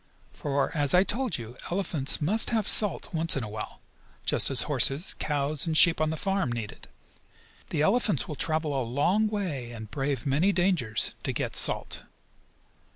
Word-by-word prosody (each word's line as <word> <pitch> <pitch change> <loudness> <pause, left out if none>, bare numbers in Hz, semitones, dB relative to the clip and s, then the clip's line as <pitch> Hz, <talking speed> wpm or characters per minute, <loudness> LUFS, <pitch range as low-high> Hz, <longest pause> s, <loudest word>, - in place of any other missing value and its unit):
For, 140 +1 -3
as 145 +1 +2
I 180 - +5
told 245 +4 -2
you, 120 +1 -10
elephants 170 -7 -1
must 200 +9 +4
have 220 -4 -1
salt 205 -5 +4
once 165 -2 +1
in 135 - -3
a - - -5
while, 105 0 -8 0.4
just - - +4
as - - +2
horses, 140 +6 +3
cows 145 +1 -2
and 160 -1 +1
sheep 170 -4 +6
on 155 - +1
the 160 - -4
farm 195 -7 -2
need 115 -3 -5
it. - - -14 0.8
The 150 -2 -1
elephants 205 - 0
will - - -6
travel 155 0 -2
a 135 - -1
long 145 - 0
way, 180 - -4
and 110 -2 -10
brave 140 +1 -3
many 150 +8 +1
dangers, 175 - 0
to - - -3
get - - -4
salt. - - 0
155 Hz, 175 wpm, -26 LUFS, 135-190 Hz, 0.8 s, sheep